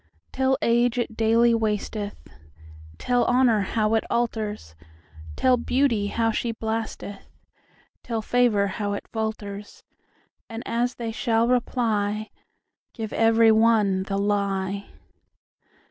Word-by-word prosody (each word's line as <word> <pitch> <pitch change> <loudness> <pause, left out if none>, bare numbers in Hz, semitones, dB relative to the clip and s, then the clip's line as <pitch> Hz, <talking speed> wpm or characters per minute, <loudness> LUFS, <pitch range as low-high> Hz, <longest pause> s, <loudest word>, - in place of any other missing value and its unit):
Tell 265 0 +1
age 240 +1 +2
it 235 -2 -2
daily 230 +1 +3
wasteth; 210 -2 -3 0.7
Tell 245 - +1
honour 245 -4 +3
how 215 +2 0
it 225 - +2
alters; 215 - -2 0.6
Tell 255 -1 +3
beauty 240 -4 +1
how 225 +2 0
she 235 +1 -2
blasteth; 220 -3 -5 0.7
Tell 225 -2 -3
favour 240 -5 +2
how 205 +1 -3
it 200 - -6
falters:And 220 +1 -8
as 240 +2 -1
they 230 -2 -4
shall 230 0 +1
reply, 215 -4 0 0.6
Give 220 -3 -5
every 225 0 +4
one 220 -4 +3
the 195 +1 -3
lie. 200 -1 -1
225 Hz, 110 wpm, -24 LUFS, 205-235 Hz, 0.7 s, every